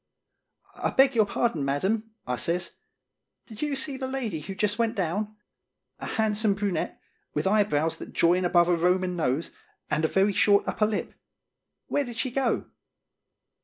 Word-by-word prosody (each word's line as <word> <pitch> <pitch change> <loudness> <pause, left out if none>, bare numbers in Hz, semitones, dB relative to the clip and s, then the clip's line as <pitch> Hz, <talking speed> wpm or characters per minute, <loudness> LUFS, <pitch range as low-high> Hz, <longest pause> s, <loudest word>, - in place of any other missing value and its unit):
"I - - 0
beg 270 0 +4
your 220 -3 +3
pardon, 200 -7 0
Madam," 190 +11 0 0.2
I 125 - -1
says; 170 +8 -2 0.7
"did 220 -2 -10
you 295 -2 0
see 270 0 -1
the 260 0 -3
lady 245 -11 -3
who 190 +6 -7
just 210 +2 0
went 230 -1 +1
down? 205 +4 -2 0.6
A - - -6
handsome 215 -1 +1
brunette, 195 -5 -2 0.4
with 150 - 0
eyebrows 190 -6 +2
that - - -9
join 175 +2 +3
above 175 -1 +4
a 175 - +3
Roman 180 +1 +1
nose, 155 -1 -1 0.4
and 155 - +1
a - - +4
very 195 +4 +2
short 200 +1 +4
upper 210 - +1
lip. 215 -1 -3 0.7
Where 290 - 0
did 240 -3 -8
she 255 - -1
go?" 260 -1 -1
200 Hz, 165 wpm, -27 LUFS, 175-225 Hz, 0.7 s, beg